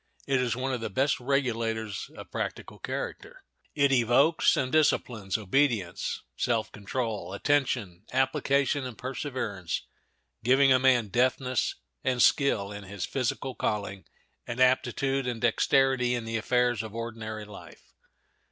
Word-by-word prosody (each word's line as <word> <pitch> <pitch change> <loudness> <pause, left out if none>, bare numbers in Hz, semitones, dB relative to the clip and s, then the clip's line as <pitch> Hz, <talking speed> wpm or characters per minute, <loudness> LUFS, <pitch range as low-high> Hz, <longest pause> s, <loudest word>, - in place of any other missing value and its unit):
It 135 -2 +2
is 120 -2 0
one 130 +1 -2
of 125 - -3
the 115 - -3
best 135 +8 +1
regulators 115 -5 -1
of - - -10
practical - - -5
character. - - -6 0.3
It 140 -1 +3
evokes 135 +6 +4
and 130 -1 0
disciplines 120 -10 +1
obedience, 110 -4 0
self 115 - 0
control, 105 -1 -4
attention, 110 -6 0
application, 135 +1 +1
and 125 -3 -7
perseverance, 125 - -4 0.6
giving 135 +2 +5
a 130 - +4
man 125 -5 +3
deftness 125 +2 +1 0.3
and 130 -1 0
skill 110 -8 +3
in 105 -1 -8
his 100 -1 -4
physical 130 0 -2
calling, 100 -4 -3 0.4
and 120 +1 -4
aptitude 130 +1 +2
and 120 -2 -2
dexterity 125 +1 +3
in 120 -2 -4
the 115 0 -2
affairs 125 -1 +1
of 110 -1 -8
ordinary 110 -2 -5
life. 105 -1 -13
125 Hz, 135 wpm, -28 LUFS, 110-130 Hz, 0.6 s, giving